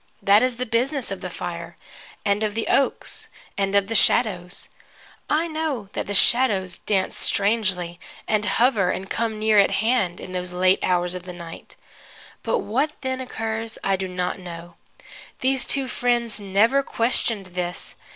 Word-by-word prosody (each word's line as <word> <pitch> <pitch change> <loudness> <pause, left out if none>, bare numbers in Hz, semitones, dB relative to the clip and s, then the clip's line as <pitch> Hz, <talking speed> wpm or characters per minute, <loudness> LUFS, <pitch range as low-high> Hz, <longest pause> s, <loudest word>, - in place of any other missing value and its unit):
That 200 +2 +6
is 255 -1 +1
the 250 +1 -3
business 250 +2 0
of 195 - -5
the 185 - -4
fire, 170 -1 -6 0.5
and 200 +1 +2
of 215 -1 -1
the 225 - -2
oaks 275 - +1 0.3
and 195 0 0
of 200 -1 +4
the 225 - -4
shadows. 190 -6 +2 0.6
I 310 +2 +2
know 310 -10 -3
that - - -3
the 205 - -2
shadows 195 -6 +2
dance 190 -3 0
strangely, 190 -5 +1 0.3
and 215 -1 +1
hover 220 -4 +3
and 195 +1 -3
come 225 -1 -1
near 215 -1 +4
at 200 - +5
hand, 215 -5 +1
in 185 - -8
those 180 -1 -4
late 185 +1 +3
hours 180 -1 +1
of 180 -1 -6
the 180 - -7
night; 170 -2 -10 0.7
but 485 - 0
what 280 - 0
then 260 -1 -2
occurs 225 -2 -4
I 195 - +2
do 190 0 -3
not 180 +1 -3
know. 175 -1 -9 0.7
These 260 0 +2
two 275 -2 +1
friends 240 -2 0
never 210 +7 +3
questioned 230 -5 +1
this. 180 -1 -3
205 Hz, 165 wpm, -23 LUFS, 185-240 Hz, 0.7 s, That